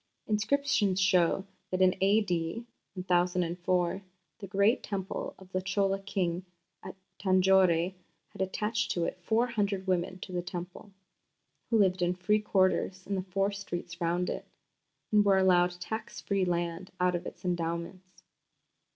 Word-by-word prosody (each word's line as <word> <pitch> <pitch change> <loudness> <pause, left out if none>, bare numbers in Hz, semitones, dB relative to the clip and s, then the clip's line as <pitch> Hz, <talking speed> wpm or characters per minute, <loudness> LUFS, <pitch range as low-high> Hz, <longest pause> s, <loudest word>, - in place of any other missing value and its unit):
Inscriptions 215 -2 +1
show 190 0 +3 0.2
that 185 - -2
in 185 -1 +5
A.D. 195 0 +1 0.3
1004 180 0 0 0.4
the 195 - -7
great 200 +5 +3
Temple 195 -2 -4
of 190 -1 -16
the 185 - -1
Chola 195 +1 0
king 190 -3 -2 0.4
at - - -8 0.2
Tanjore 185 -2 +4 0.4
had - - -8
attached 210 +3 -1
to 170 -1 0
it 185 - -4
four 225 +6 +2
hundred 205 -5 -1
women 185 0 -1
of 185 - -9
the 175 - -1
Temple, 180 +3 -7 0.8
who 230 - +3
lived 190 -3 +3
in 175 +1 +1
free 210 +4 +2
quarters 185 -2 +1
in 200 - -3
the 190 - 0
four 195 +2 -1
streets 175 -3 -6
round 175 +2 0
it, - - -6 0.6
and 210 -1 +5
were 200 -1 +4
allowed 180 -1 +3
tax 220 +5 -5
free 195 -2 0
land 175 +1 -2
out 180 0 +3
of 175 +1 -3
its 180 - -10
endowments. 175 +1 -4
185 Hz, 145 wpm, -30 LUFS, 180-200 Hz, 0.8 s, in